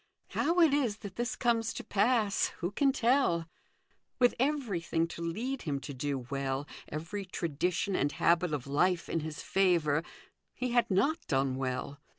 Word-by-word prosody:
How 335 Hz, +4 st, +1 dB
it 320 Hz, -4 st, +6 dB
is 250 Hz, -8 st, +1 dB
that 195 Hz, -, -7 dB
this 240 Hz, +1 st, -2 dB
comes 230 Hz, -2 st, +1 dB
to -, -, -5 dB
pass, 215 Hz, 0 st, +2 dB
who 175 Hz, +2 st, -2 dB
can 275 Hz, +6 st, +3 dB
tell? 235 Hz, -, +2 dB, 0.7 s
With 245 Hz, -1 st, +4 dB
everything 210 Hz, -, 0 dB
to 170 Hz, -, -7 dB
lead 235 Hz, +11 st, -3 dB
him 140 Hz, -3 st, -2 dB
to 145 Hz, -, -6 dB
do 140 Hz, +2 st, -2 dB
well, 135 Hz, +1 st, -2 dB, 0.2 s
every 165 Hz, +7 st, -4 dB
tradition 180 Hz, +2 st, -1 dB
and 145 Hz, -2 st, +1 dB
habit 170 Hz, 0 st, +2 dB
of 145 Hz, -4 st, -2 dB
life 170 Hz, +5 st, +1 dB
in 165 Hz, -, -1 dB
his 155 Hz, 0 st, -6 dB
favour, 170 Hz, -6 st, +2 dB, 0.5 s
he 250 Hz, -1 st, -2 dB
had 240 Hz, 0 st, +3 dB
riot 275 Hz, -, +1 dB
done 135 Hz, -1 st, +1 dB
well. 130 Hz, +2 st, -3 dB
180 Hz, 160 wpm, -31 LUFS, 150-240 Hz, 0.7 s, it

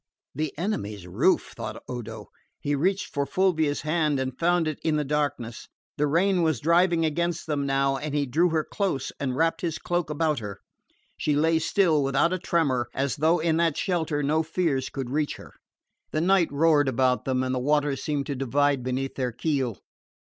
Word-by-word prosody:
"The 155 Hz, +1 st, -2 dB
enemy's 105 Hz, -, -3 dB
roof!" 105 Hz, -, +1 dB
thought 110 Hz, -2 st, -6 dB
Odo. 110 Hz, -4 st, -7 dB, 0.3 s
He 145 Hz, -, -1 dB
reached 190 Hz, +7 st, 0 dB
for 140 Hz, -1 st, -1 dB
Fulvia's 160 Hz, -6 st, +1 dB
hand 155 Hz, -2 st, +1 dB
and 130 Hz, -1 st, -3 dB
found 175 Hz, -1 st, +2 dB
it 155 Hz, -, -3 dB
in 160 Hz, -1 st, +1 dB
the 150 Hz, -, +1 dB
darkness. 140 Hz, -6 st, -2 dB, 0.3 s
The 150 Hz, -, +2 dB
rain 180 Hz, +5 st, +2 dB
was 160 Hz, -6 st, +1 dB
driving 170 Hz, +3 st, +3 dB
against 170 Hz, +2 st, -1 dB
them 145 Hz, -3 st, -1 dB
now 135 Hz, 0 st, +1 dB
and 145 Hz, +1 st, -4 dB
he 145 Hz, -1 st, +1 dB
drew 160 Hz, +8 st, +2 dB
her 160 Hz, -1 st, +1 dB
close 180 Hz, -10 st, -2 dB
and 130 Hz, -3 st, -2 dB
wrapped 165 Hz, +4 st, +1 dB
his 165 Hz, -3 st, -2 dB
cloak 175 Hz, -2 st, -2 dB
about 150 Hz, -1 st, 0 dB
her. 100 Hz, -3 st, -7 dB, 0.6 s
She 150 Hz, -, 0 dB
lay 160 Hz, +2 st, +3 dB
still, 160 Hz, -2 st, +2 dB
without 140 Hz, +6 st, +2 dB
a 185 Hz, -, -1 dB
tremor, 140 Hz, -9 st, +1 dB
as 135 Hz, -1 st, -1 dB
though 160 Hz, +4 st, +3 dB
in 160 Hz, -1 st, +1 dB
that 165 Hz, -3 st, +1 dB
shelter 160 Hz, -6 st, -1 dB
no 155 Hz, +3 st, +2 dB
fears 160 Hz, -5 st, -1 dB
could 130 Hz, -3 st, -5 dB
reach 150 Hz, +1 st, 0 dB
her. -, -, -13 dB, 0.6 s
The 155 Hz, -, -1 dB
night 180 Hz, -2 st, +3 dB
roared 145 Hz, 0 st, +3 dB
about 130 Hz, 0 st, +1 dB
them 130 Hz, -1 st, 0 dB
and 130 Hz, 0 st, -1 dB
the 130 Hz, -, 0 dB
waters 145 Hz, 0 st, +1 dB
seemed 145 Hz, -2 st, -1 dB
to 140 Hz, -, -3 dB
divide 140 Hz, +1 st, +1 dB
beneath 130 Hz, +2 st, -2 dB
their 125 Hz, -2 st, -2 dB
keel. 130 Hz, -, -1 dB
150 Hz, 190 wpm, -26 LUFS, 135-165 Hz, 0.6 s, driving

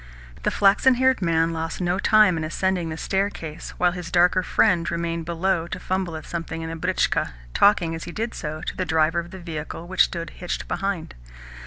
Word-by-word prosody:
The -, -, +1 dB
flaxen 205 Hz, +6 st, +4 dB
haired 260 Hz, -2 st, +3 dB
man 165 Hz, -1 st, +2 dB
lost 165 Hz, 0 st, -4 dB
no 180 Hz, +1 st, 0 dB
time 215 Hz, -4 st, +5 dB
in 160 Hz, -, -2 dB
ascending 175 Hz, +1 st, -1 dB
the 160 Hz, -, -5 dB
staircase, 190 Hz, -5 st, -3 dB
while 180 Hz, 0 st, +3 dB
his 175 Hz, -1 st, -6 dB
darker 180 Hz, +1 st, +4 dB
friend 180 Hz, -2 st, +2 dB
remained 170 Hz, -1 st, -2 dB
below 170 Hz, 0 st, 0 dB
to -, -, -5 dB
fumble 185 Hz, -3 st, -2 dB
at 155 Hz, -, -7 dB
something 165 Hz, -1 st, -5 dB
in 160 Hz, -, -5 dB
the -, -, -4 dB
britchka, 180 Hz, -, 0 dB, 0.2 s
talking, 180 Hz, -5 st, +4 dB
as 165 Hz, -, -5 dB
he 175 Hz, -, -6 dB
did 225 Hz, +5 st, -3 dB
so, 155 Hz, +1 st, -5 dB
to -, -, -4 dB
the 185 Hz, -, -1 dB
driver 160 Hz, -1 st, +2 dB
of 170 Hz, 0 st, -6 dB
the 190 Hz, -, -9 dB
vehicle 165 Hz, -1 st, -6 dB
which 185 Hz, +1 st, +4 dB
stood 170 Hz, -2 st, -5 dB
hitched 180 Hz, -, -5 dB
behind. 195 Hz, -3 st, -3 dB
175 Hz, 200 wpm, -24 LUFS, 165-190 Hz, 0.2 s, time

